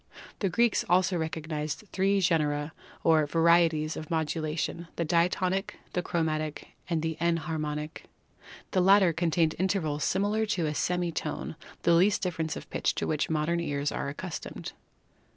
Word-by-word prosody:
The 195 - +1
Greeks 235 +5 +2
also 180 +1 +3
recog 160 -1 -3
nised 155 +4 -4
three 195 +1 +2
genera 150 -3 +1 0.3
or 155 -2 +4
varieties 165 -1 +3
of 155 - -7
modulation 160 +1 -2
— - - -34
the 170 - -1
Diatonic, 180 +4 +1 0.2
the 180 - 0
Chromatic 155 -3 -2 0.2
and 165 -2 0
the 160 -1 -2
Enharmonic. 155 -2 -2 0.7
The 185 - +2
latter 190 -2 +6
contained 165 -1 +1
intervals 165 -6 0
smaller 205 +3 +1
than 180 -5 0
a 150 - -1
semi 175 +2 0
tone - - -4
— - - -20
the 170 - +4
least 190 +5 +4
difference 165 -3 -2
of - - -8
pitch - - 0
to - - -1
which 150 -1 0
modern 160 +2 +1
ears 145 -3 -1
are 140 - -3
accustomed. 170 +4 -6
165 Hz, 155 wpm, -28 LUFS, 155-180 Hz, 0.7 s, latter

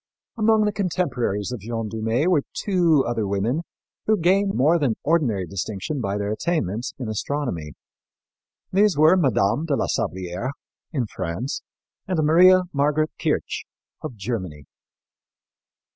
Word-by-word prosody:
Among 220 -1 +3
the 210 - +1
contemporaries 130 - -1
of 125 - -4
Jeanne 115 +2 -4
Dumée 115 +5 -1
were 175 -5 +3
two 170 -8 +2
other 115 -3 -1
women 105 +10 0 0.5
who 215 0 +4
gained 195 +3 +2
more 155 +6 +4
than 130 -7 +1
ordinary 130 - +1
distinction 100 - -4
by 100 -2 -1
their 100 0 -2
attainments 115 - -2
in 125 - -5
astronomy. 110 - -3 1.0
These 200 -3 +4
were 155 +4 +6
Mme. 135 - +2
de 145 - +2
la - - 0
Sablière, 95 +2 -3 0.4
in 135 -7 -1
France, 95 - -4 0.5
and 185 -2 -1
Maria 180 +4 +6
Margaret 150 +2 +1
Kirch, - - -1 0.4
of 125 - -6
Germany. 95 - -5
130 Hz, 130 wpm, -23 LUFS, 105-170 Hz, 1.0 s, were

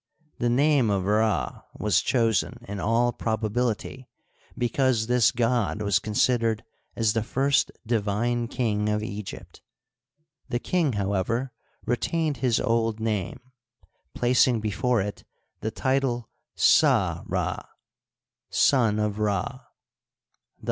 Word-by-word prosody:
The 120 - +1
name 135 -1 +3
of 95 -2 0
Rd 105 - 0 0.2
was - - +2
chosen, 115 0 0
in 100 0 -5
all 115 +4 +2
probability, 115 +3 -2 0.5
because 120 -1 +1
this 125 -1 +4
god 115 -3 0
was 100 -2 +2
considered 115 +1 +1 0.3
as 110 -3 +1
the 115 - 0
first 135 +5 +1
divine 115 +2 0
king 105 -4 -1
of 105 0 0
Egypt. 105 -2 -8 0.9
The 120 - 0
king, 155 +1 0
however, 100 +6 -1 0.3
re 120 - +1
tained 155 0 -1
his 120 -2 +1
old 115 -2 0
name, 110 -5 -2 0.7
placing 125 -1 +3
before 110 +2 0
it 100 +1 -5 0.4
the 110 - -2
title 130 -1 -1 0.2
Sa - - +4
Rd, - - -2 0.4
" - - -67
Son 115 -6 +3
of 105 -1 -1
Rd." 105 +4 -1
115 Hz, 115 wpm, -26 LUFS, 105-125 Hz, 0.9 s, this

